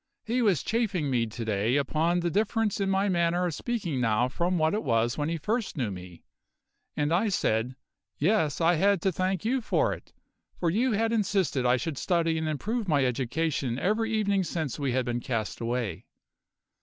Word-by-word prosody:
He 240 +3 0
was 195 - +2
chaffing 205 - 0
me 120 -2 +1
to 115 +1 -6
day 110 +3 +1
upon 160 +5 +1
the 170 0 -1
difference 215 +1 0
in 195 - +1
my 195 +1 +2
manner 175 -1 +1
of 175 - -1
speaking 175 - -2
now 115 +1 +2
from 175 +7 0
what 160 -1 +2
it 215 - 0
was 120 -2 +1
when 150 +1 -1
he 165 - -1
first 215 +4 -2
knew 120 -7 -1
me, 90 -2 -10 0.7
and 150 +2 +1
I 205 +6 +2
said: 125 - 0 0.4
Yes, 160 -3 +1
I 170 +1 +4
had 195 +3 +3
to 190 - +2
thank 185 +2 -1
you 255 +3 +1
for - - +1
it, - - -11 0.5
for 170 -2 +1
you 235 +6 +1
had 225 +2 +1
insisted 190 - +1
I 125 +1 +4
should 140 +3 -4
study 165 -2 +1
and 160 - -2
improve 210 - -2
my 145 -5 +3
education 130 +1 -1
every 215 +8 0
evening 200 -3 +1
since 160 -5 -3
we 140 -3 0
had 130 -1 +1
been 120 0 -1
cast 115 -4 -3
away. 115 -6 -3
165 Hz, 195 wpm, -28 LUFS, 125-200 Hz, 0.7 s, I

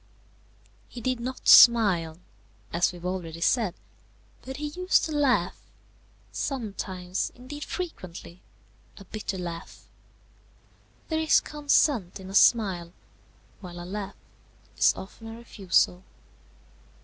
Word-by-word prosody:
He 245 - -9
did 255 0 -1
not 255 +2 -6
smile, 190 -9 +7 0.6
as 170 +3 +2
we 180 - -11
have 175 - -11
already 175 -3 -4
said, 215 -1 +1 0.7
but 265 +1 -8
he 295 0 -4
used 365 +4 +1
to 315 - -5
laugh; 265 - +1 0.7
sometimes, 195 -8 -3
indeed 290 +4 -8
frequently, 185 - -7 0.6
a 195 - -12
bitter 205 -1 -5
laugh. 170 -1 -7 1.2
There 315 -1 0
is 320 -1 +4
consent 290 - +1
in 190 0 -9
a - - -9
smile, 190 -6 +3 0.7
while 175 -3 -9
a 175 - -7
laugh 200 +1 -6 0.6
is - - +5
often 225 +4 -10
a 225 0 -8
refusal. 190 - +1
200 Hz, 115 wpm, -27 LUFS, 180-255 Hz, 1.2 s, smile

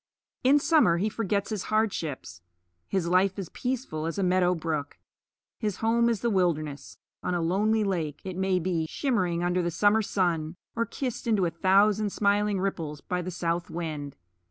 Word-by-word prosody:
In 270 +3 +6
summer 290 - +4
he 205 +5 0
forgets 205 -1 -1
his 210 -4 -3
hardships. 165 - -2 0.5
His 185 -3 -1
life 185 +2 +3
is 195 -4 -5
peaceful 245 -12 -3
as 165 - -4
a 200 - +1
meadow 180 0 +3
brook. 155 -3 -3 0.6
His 210 -5 -1
home 235 +1 +2
is 230 -4 -1
the 235 - +1
wilderness 155 -7 -1 0.2
on 180 - -1
a - - 0
lonely 210 +6 +2
lake, 165 -7 -2
it 185 -2 -5
may 190 0 +1
be, 170 -2 -1
shimmering 185 - 0
under 175 +1 +1
the 170 - 0
summer 205 +6 +3
sun, 175 -5 -1 0.2
or 230 0 0
kissed 250 -3 -4
into 210 -5 +3
a 170 - 0
thousand 200 +4 +3
smiling 205 0 +1
ripples 165 -6 -3
by 180 +3 -3
the 180 - -5
south 170 -1 -2
wind. 155 -4 -5
185 Hz, 175 wpm, -27 LUFS, 170-210 Hz, 0.6 s, In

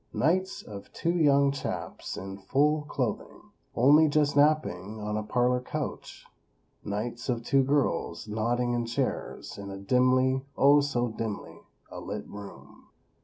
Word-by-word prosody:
Nights 185 +6 +1
of 100 -2 -10
two 170 - 0
young 140 -4 +4
chaps, 140 - -5
in 95 +1 -7
full 145 +9 +2
clothing, 125 -6 -4 0.2
only 145 +6 +6
just 145 -1 +2
napping 145 -9 +2
on 105 0 -3
a 110 - -1
parlor 125 +3 +1
couch. - - -6 0.6
Nights 115 +5 -4
of 120 -2 -1
two 135 +3 +3
girls 135 -9 0
nodding 120 +3 0
in 120 -1 -1
chairs 115 - -3
in 100 0 -7
a 95 - -6
dimly, 130 +5 +2
oh, 140 +2 +6
so 125 -4 0
dimly 110 -2 -5 0.3
a - - -7
lit 105 +1 -6
room. 100 -1 -12
125 Hz, 140 wpm, -28 LUFS, 105-140 Hz, 0.6 s, only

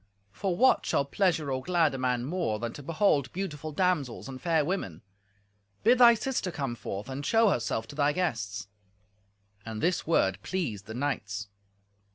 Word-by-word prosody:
For 175 - -2
what 260 +3 +4
shall 140 - +1
pleasure 160 -2 +1
or 130 0 -1
glad 170 -2 +2
a - - -3
man 125 -1 0
more 160 -8 -1
than 115 +1 -4
to - - -9
behold 150 - +1
beautiful 155 -5 -4
damsels 150 -8 0
and 130 -1 -8
fair 165 -4 +2
women? 120 - -3 0.8
Bid 240 +4 +5
thy 235 -1 +8
sister 240 -4 -2
come 135 -7 -3
forth 105 -2 -6
and 135 +1 -5
show 225 +5 +4
herself 115 - -1
to - - -9
thy 145 0 +3
guests." 110 - -2 1.0
And 110 -1 -6
this 175 +3 0
word 95 - +2
pleased 115 - -3
the 110 - -6
knights. 105 -7 -3
145 Hz, 170 wpm, -29 LUFS, 120-180 Hz, 1.0 s, thy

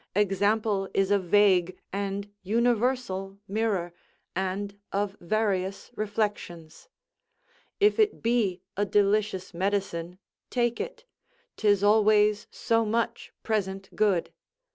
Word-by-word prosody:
Example 205 0 +1
is 195 0 +2
a 205 - +4
vague 185 -1 +3 0.2
and 200 0 -3
universal 225 -2 0
mirror, 200 -4 -1 0.4
and 190 +2 -2 0.2
of 200 0 -1
various 195 0 -1
reflections. 205 - -4 0.9
If 420 +2 +4
it 430 -1 +2
be 220 -6 +1
a 205 - +1
delicious 205 -1 +1
medicine, 180 -2 -2 0.3
take 240 -1 0
it: 475 0 -7 0.5
'tis 205 -2 +2
always 210 0 +4
so 230 0 +1
much 230 +2 -2
present 195 -3 -2
good. 200 -5 +1
205 Hz, 100 wpm, -27 LUFS, 190-220 Hz, 0.9 s, a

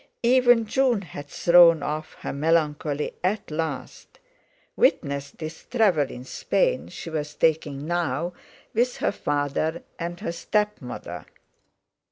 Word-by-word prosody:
Even 245 -1 +5
June 245 -2 +2
had 145 -3 -9
thrown 170 0 +6
off 155 +2 -4
her - - -4
melancholy 150 -1 0
at 190 -1 -1
last—witness 140 -2 -3
this 155 +2 -8
travel 190 - +2
in 125 - -8
Spain - - 0
she 165 - -8
was 150 -1 -3
taking 150 -3 +1
now 170 0 -1 0.4
with 245 +2 +1
her - - +1
father 145 0 -1 0.2
and 170 0 -4
her - - -2
stepmother. 210 - -3
165 Hz, 115 wpm, -25 LUFS, 145-200 Hz, 0.4 s, thrown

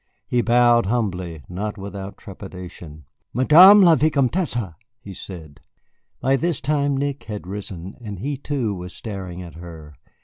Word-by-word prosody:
He 125 - +1
bowed 120 -2 +4
humbly, 90 - -2
not 105 +4 -5
without 100 0 -7
trepidation. 90 -6 -10 0.3
"Madame 180 +11 +8
la 170 -2 +7
Vicomtesse!" 140 - 0 0.3
he 100 -5 -10
said. 80 -6 -10 0.6
By 135 +1 +2
this 165 0 -1
time 145 -2 0
Nick 140 0 -3
had 105 -3 -6
risen, 95 -1 -6
and 105 -4 -7
he, 140 +10 -3
too, 135 -6 -2
was 90 -2 -7
staring 95 -5 -7
at 85 - -11
her. 80 -3 -11
105 Hz, 140 wpm, -22 LUFS, 90-135 Hz, 0.6 s, Madame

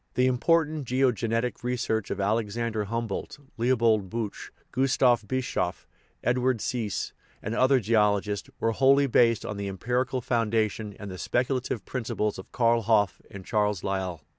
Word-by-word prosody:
The 125 - +3
important 150 +2 +1
geogenetic 125 -2 0
research 120 -4 -1
of - - -3
Alex 105 +2 0
ander 115 -3 -1
Humboldt, 115 +3 -4 0.2
Leopold 115 -4 +2
Buch, 115 -1 -5 0.2
Gustav 125 -3 +2
Bischof, 115 -8 -2 0.4
Ed 120 +1 +2
ward 130 0 +2
Siiss, 110 -3 -2 0.3
and 110 - -3
other 130 +2 +4
geologists, 105 -2 +1
were 115 - +1
wholly 135 +4 +4
based 115 -3 +3
on 105 - -4
the 100 0 -3
empirical 125 +7 -1
foundation 110 -3 -1
and 100 -2 -7
the 90 - -8
speculative 125 -2 -1
principles 105 -5 -2
of 95 - -11
Karl 115 -1 +3
Hoff 105 -2 +2
and 95 -2 -10
Charles 105 -4 0
Lyell. 95 -4 -3
115 Hz, 145 wpm, -27 LUFS, 105-125 Hz, 0.4 s, other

